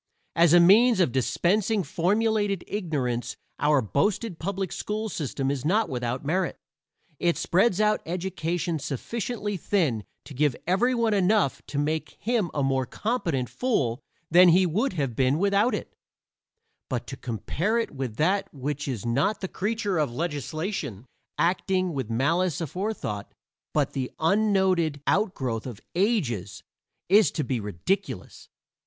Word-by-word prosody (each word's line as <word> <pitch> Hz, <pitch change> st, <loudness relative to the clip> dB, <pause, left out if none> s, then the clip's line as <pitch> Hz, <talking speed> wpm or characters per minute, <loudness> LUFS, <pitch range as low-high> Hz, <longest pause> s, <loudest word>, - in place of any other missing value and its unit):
As 170 Hz, -1 st, +5 dB
a 175 Hz, -, +8 dB
means 215 Hz, +6 st, +6 dB
of 170 Hz, -9 st, +3 dB
dispensing 190 Hz, -, +1 dB
formulated 205 Hz, +2 st, +1 dB
ignorance 140 Hz, -, -2 dB, 0.2 s
our 145 Hz, -3 st, +3 dB
boasted 180 Hz, -, 0 dB
public 190 Hz, 0 st, -3 dB
school 215 Hz, +1 st, -3 dB
system 140 Hz, -5 st, -2 dB
is 135 Hz, -3 st, -3 dB
not 205 Hz, +7 st, +2 dB
without 125 Hz, +1 st, -3 dB
merit; 180 Hz, +4 st, 0 dB, 0.6 s
it 170 Hz, -1 st, +1 dB
spreads 190 Hz, +2 st, +2 dB
out 215 Hz, 0 st, +3 dB
education 170 Hz, -2 st, -2 dB
sufficiently 205 Hz, -, -3 dB
thin 155 Hz, -, 0 dB, 0.2 s
to 145 Hz, -, -10 dB
give 145 Hz, -1 st, +1 dB
everyone 230 Hz, +4 st, +2 dB
enough 195 Hz, -5 st, +2 dB
to 145 Hz, -, -5 dB
make 155 Hz, +2 st, -2 dB
him 225 Hz, -6 st, 0 dB
a 145 Hz, -, -1 dB
more 135 Hz, -1 st, +1 dB
competent 175 Hz, -, -1 dB
fool 140 Hz, -, -1 dB, 0.3 s
than 180 Hz, +2 st, +8 dB
he 185 Hz, +3 st, +5 dB
would 200 Hz, -, 0 dB
have 140 Hz, -8 st, -2 dB
been 130 Hz, +3 st, +2 dB
without 200 Hz, +6 st, +2 dB
it; -, -, -7 dB, 1.0 s
but 125 Hz, -3 st, -2 dB
to 135 Hz, -, -7 dB
compare 145 Hz, -, -2 dB
it 230 Hz, -, -1 dB
with 130 Hz, -6 st, -4 dB
that 195 Hz, -, +1 dB
which 145 Hz, +1 st, -4 dB
is 120 Hz, -6 st, -3 dB
not 140 Hz, -, +1 dB
the 190 Hz, -, -3 dB
creature 205 Hz, -2 st, -1 dB
of 145 Hz, -5 st, 0 dB
legislation 150 Hz, -, -3 dB, 0.3 s
acting 185 Hz, +2 st, +1 dB
with 130 Hz, -5 st, -3 dB
malice 155 Hz, +8 st, +1 dB
aforethought, 170 Hz, -, -4 dB, 0.4 s
but -, -, 0 dB
the 130 Hz, -2 st, -2 dB
unnoted 185 Hz, -4 st, +2 dB
out 200 Hz, 0 st, +1 dB
growth 120 Hz, -3 st, -3 dB
of 120 Hz, -5 st, -7 dB
ages, 140 Hz, -, 0 dB, 0.4 s
is 205 Hz, +3 st, +6 dB
to 155 Hz, -, -2 dB
be 125 Hz, -2 st, -1 dB
ridiculous. 105 Hz, -, -3 dB
170 Hz, 140 wpm, -26 LUFS, 135-200 Hz, 1.0 s, a